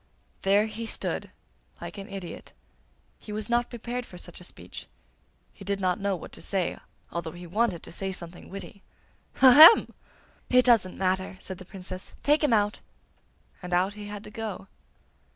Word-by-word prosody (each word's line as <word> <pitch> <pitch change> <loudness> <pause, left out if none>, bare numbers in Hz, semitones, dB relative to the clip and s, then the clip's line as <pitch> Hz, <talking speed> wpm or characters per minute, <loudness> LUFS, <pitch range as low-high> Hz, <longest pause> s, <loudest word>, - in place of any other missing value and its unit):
There 200 +2 +4
he 225 +1 -5
stood - - -3 0.5
like - - -7
an 195 +3 -8
idiot. 195 -3 -8 0.7
He 210 - -10
was 215 +2 -3
not 240 0 +2
prepared 240 +1 -4
for 180 - -12
such 175 0 -10
a - - -10
speech; - - -10 0.7
he 200 - -12
did 200 0 -2
not 185 +1 +1
know 200 -1 0
what 175 - -9
to - - -11
say, 190 -3 -1 0.3
although 170 -2 -4
he 175 0 -9
wanted 195 0 0
to - - -10
say 190 +3 -3
something 175 -1 -9
witty. 195 +1 -9 0.6
'Ahem!' 305 - +10 0.6
'It 250 0 +5
doesn't 225 -7 +4
matter!' 190 0 -1
said 190 -1 -8
the 185 - -10
Princess. 185 0 -8
'Take 295 +2 +3
him 295 - +3
out!' 210 -1 +2 0.8
and 180 -1 -5
out 185 +3 +2
he 210 0 -8
had 205 0 -7
to 210 - -10
go. 215 -3 -5
200 Hz, 170 wpm, -27 LUFS, 185-225 Hz, 0.8 s, Ahem